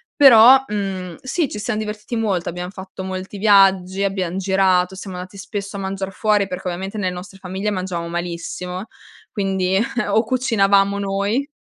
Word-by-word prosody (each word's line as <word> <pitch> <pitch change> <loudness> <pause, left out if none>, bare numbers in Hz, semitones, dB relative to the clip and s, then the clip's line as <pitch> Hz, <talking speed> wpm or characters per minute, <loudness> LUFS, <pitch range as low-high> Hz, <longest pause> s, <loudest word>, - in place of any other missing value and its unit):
però, 260 -1 +8
mhmm, 190 -4 -4
sì 290 +4 -1
ci 210 - -6
siam 210 - -2
divertiti 215 +2 -4
molto, 200 -6 -1
abbiam 180 +1 -5
fatto 190 -1 -9
molti 190 +2 -6
viaggi, 195 -2 +4
abbiam 190 -3 -1
girato, 190 -1 +2
siamo 190 -1 -8
andati 185 +2 -8
spesso 200 0 -6
a - - -5
mangiar 195 0 -4
fuori 210 -1 +1
perché 185 0 -6
ovviamente 190 +4 -4
nelle 185 -3 -1
nostre 185 +2 -9
famiglie 190 +2 -3
mangiavamo 180 -3 -3
malissimo, 175 +3 -5 0.4
quindi 190 -2 0 0.3
o 220 +3 +3
cucinavamo 200 -5 +2
noi 200 +7 -1
195 Hz, 155 wpm, -20 LUFS, 185-210 Hz, 0.4 s, però